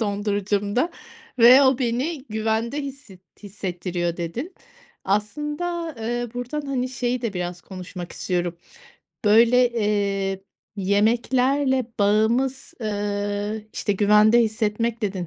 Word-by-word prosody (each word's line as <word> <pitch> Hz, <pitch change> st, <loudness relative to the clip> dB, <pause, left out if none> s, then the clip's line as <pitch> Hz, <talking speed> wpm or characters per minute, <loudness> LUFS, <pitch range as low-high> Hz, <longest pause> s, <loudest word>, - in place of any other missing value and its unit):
dondurucumda 205 Hz, -, 0 dB, 0.5 s
ve 245 Hz, +4 st, +8 dB
o 260 Hz, -2 st, +4 dB
beni 260 Hz, +4 st, -1 dB
güvende 220 Hz, +5 st, -1 dB
hisset 275 Hz, -9 st, -9 dB, 0.2 s
hissettiriyor" 180 Hz, -3 st, -3 dB
dedin. 230 Hz, -, -5 dB, 0.5 s
Aslında, 295 Hz, -, -2 dB
ııı, 240 Hz, +1 st, -3 dB
buradan, 250 Hz, +5 st, -4 dB
hani, 255 Hz, -2 st, -1 dB
şeyi 250 Hz, 0 st, -2 dB
de 230 Hz, -4 st, -2 dB
biraz 180 Hz, -1 st, -4 dB
konuşmak 180 Hz, -1 st, -8 dB
istiyorum. 175 Hz, -2 st, -2 dB, 0.7 s
Böyle, 235 Hz, +4 st, +5 dB
eee, 200 Hz, -3 st, 0 dB, 0.4 s
yemeklerle 250 Hz, +7 st, +2 dB
bağımız, 230 Hz, +6 st, +1 dB
ııı, 205 Hz, 0 st, -2 dB
işte, 205 Hz, -, -1 dB
"güvende 210 Hz, +3 st, +5 dB
hissetmek" 225 Hz, +1 st, -1 dB
dedin. 190 Hz, -4 st, -2 dB
220 Hz, 100 wpm, -23 LUFS, 200-250 Hz, 0.7 s, ve